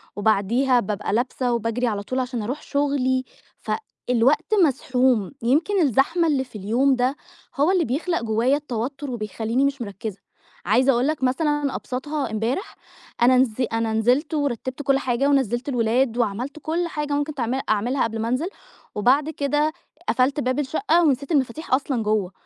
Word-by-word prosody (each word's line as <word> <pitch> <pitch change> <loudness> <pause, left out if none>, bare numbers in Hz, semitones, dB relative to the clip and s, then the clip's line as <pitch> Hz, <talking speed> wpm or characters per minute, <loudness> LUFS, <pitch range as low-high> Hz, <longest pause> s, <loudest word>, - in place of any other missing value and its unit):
وبعديها 220 +5 +2
بابقى 205 -2 -3
لابسة 245 +1 0
وباجري 235 +2 -1
على 205 -3 -2
طول 255 +5 -2
عشان 250 -2 -2
اروح 255 +8 -4
شغلي، 275 -3 0 0.4
ف - - -6 0.4
الوقت 270 - +2
مزحوم، 255 - +1
يمكن 320 - +2
الزحمة 310 +5 +2
اللي 280 -4 +1
في 250 -4 -11
اليوم 240 +7 +2
ده 250 +2 +1 0.4
هو 295 +5 +3
اللي 365 -3 +2
بيخلق 330 +8 -1
جوايا 230 +5 +2
التوتُّر 275 0 -4
وبيخلّيني 225 +3 -1
مش 280 -2 -1
مركّزة، 205 -1 -6 0.5
عايزة 250 +8 +4
اقول 245 +1 +1
لك 305 -4 -2
مثلًا 295 +1 0
ابساطها 280 +1 -3
امبارح، 230 - -2 0.5
أنا 255 +1 +6
نز 255 -3 +3 0.2
أنا 225 -1 0
نزلت 250 +8 +1
ورتّبت 270 -2 -2
كلّ 275 -1 +2
حاجة 260 +1 0
ونزّلت 265 -1 +1
الولاد 240 0 +1
وعملت 245 +6 -2
كلّ 335 +3 -1
حاجة 295 -2 -3
ممكن 290 +1 -1
تعمل 255 0 -1
اعملها 235 +6 +1
قبل 225 0 -2
ما 225 - -1
انزل، 255 +8 0 0.5
وبعد 265 +8 +3
كده 295 +1 0 0.4
قفلت 260 +3 +2
باب 255 +1 0
الشقة 330 +5 +2
ونسيت 280 -1 +1
المفاتيح 270 0 0
أصلًا 260 -3 +1
جوّه، 210 -3 0
260 Hz, 160 wpm, -23 LUFS, 230-285 Hz, 0.5 s, أنا